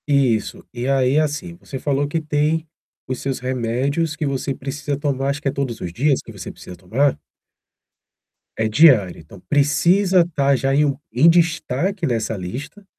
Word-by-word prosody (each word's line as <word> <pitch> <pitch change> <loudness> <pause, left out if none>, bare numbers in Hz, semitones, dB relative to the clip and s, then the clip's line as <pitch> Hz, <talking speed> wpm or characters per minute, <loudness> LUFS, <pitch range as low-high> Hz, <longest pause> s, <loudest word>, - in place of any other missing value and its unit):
Isso, 135 -7 +1
e 120 +1 -4
aí, 135 -1 +2
é - - +5
assim, 155 +3 -3
você 135 - -8
falou 145 +1 0
que 160 +3 -1
tem 155 +1 0 0.4
os 130 -1 -3
seus 135 -1 -3
remédios 130 +5 -1
que 155 - -3
você 140 0 -2
precisa 140 +1 -4
tomar, 140 -2 -1
acho 140 +1 -2
que 145 - -3
é - - +2
todos 130 -5 -3
os 85 -2 -5
dias 135 +5 +2
que - - -11
você 100 -4 -8
precisa 90 0 -11
tomar? 115 +11 +1 1.4
É 110 - +1
diário, 110 - +5
então 85 +4 -14
precisa 175 +6 +3
estar 140 -5 +1
já 135 +1 0
em 150 - +4
um 140 -2 -1 0.2
em 145 +8 +6
destaque 170 +2 +1
nessa 115 -2 -1
lista. 130 - -7
140 Hz, 175 wpm, -21 LUFS, 125-150 Hz, 1.4 s, em